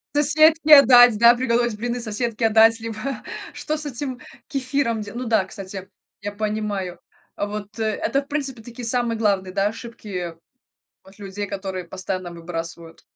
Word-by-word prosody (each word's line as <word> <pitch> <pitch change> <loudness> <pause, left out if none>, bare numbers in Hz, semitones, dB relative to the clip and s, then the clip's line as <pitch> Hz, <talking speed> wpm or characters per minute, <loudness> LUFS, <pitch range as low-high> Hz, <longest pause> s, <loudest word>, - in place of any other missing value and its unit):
Соседке 310 +1 +6
отдать, 245 -4 +8
да, 235 +2 +7
приготовить 240 -2 0
блины, 240 +3 -3
соседке 230 0 -2
отдать, 225 +1 +5
либо 230 +4 -5 0.3
что 310 0 -3
с 300 - -3
этим 260 -1 -5 0.3
кефиром 260 -4 -1
делать? 210 +3 -7
Ну - - -6
да, 220 -3 +3
кстати, 195 -1 -9
я 190 -1 -6 0.4
я 205 0 -4
понимаю. 210 -3 -3 0.4
А 205 - -2
вот, 210 +1 -7
э, 220 - 0
это, 220 +6 0
в 275 - -17
принципе, 275 -5 -3
такие 240 +1 -9
самые 240 -1 0
главные, 200 -4 0
да, 195 0 +1
ошибки 205 -6 -6 0.7
от 195 +2 -19
людей, 200 +1 -5
которые 190 -2 -5
постоянно 185 0 -5
выбрасывают. 165 -1 -7
220 Hz, 160 wpm, -22 LUFS, 200-245 Hz, 0.7 s, отдать